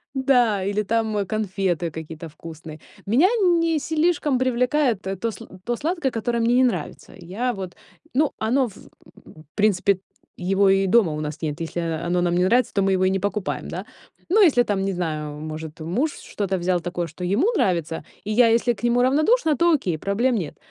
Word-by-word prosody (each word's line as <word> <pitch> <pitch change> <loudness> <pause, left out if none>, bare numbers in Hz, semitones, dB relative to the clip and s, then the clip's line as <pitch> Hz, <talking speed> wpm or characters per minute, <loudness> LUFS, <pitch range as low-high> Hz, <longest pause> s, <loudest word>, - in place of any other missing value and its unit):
Да, 245 -7 +2
или 205 +2 0
там 215 -1 0
конфеты 190 -5 -1
какие-то 160 +1 -8
вкусные. 160 0 -10 0.3
Меня 255 - +4 0.3
не 330 -1 +1
слишком 310 -3 +1
привлекает 250 -2 +1
т 190 0 -4
то, 230 +5 -2
сла 190 - -11 0.2
то 240 - -1
сладкое, 310 0 -1
которое 235 +1 -1
мне 235 +1 +2
не 260 - +5
нравится. 250 - -2
Я 195 +8 -3
вот, 190 -3 -7 0.4
ну, 295 +2 +2
оно, 250 +4 +1
в, 195 - -16 0.5
м, 155 0 -15
принципе, 200 -2 +2 0.4
его 195 +2 +2
и 195 0 +3
дома 200 -4 +4
у 150 - -4
нас 150 +1 -5
нет. 150 -1 -3
Если 165 +1 -4
оно 170 +2 -1
нам 175 -1 +1
не 180 +1 +3
нравится, 245 +4 +2
то 200 - +1
мы 195 0 +2
его 185 - +1
и 185 - +3
не 195 - 0
покупаем, 205 0 -3
да. - - -6 0.4
Ну, 430 +4 +4
если 290 -11 +5
там, 200 -4 -1
не 195 - -1
знаю, 155 -4 -4
может, 155 0 -7
муж 245 - -1
что-то 195 -2 -3
взял 180 0 0
такое, 175 0 -3
что 170 +4 -9
ему 215 - +2
нравится, 170 - 0 0.2
и 210 - -4
я, 235 +2 +5
если 235 +1 +3
к - - -15
нему 240 +1 +3
равнодушна, 310 - +3
то 340 0 +4
окей, 185 - 0
проблем 230 +9 0
нет. 170 -9 -4
200 Hz, 195 wpm, -23 LUFS, 175-245 Hz, 0.5 s, не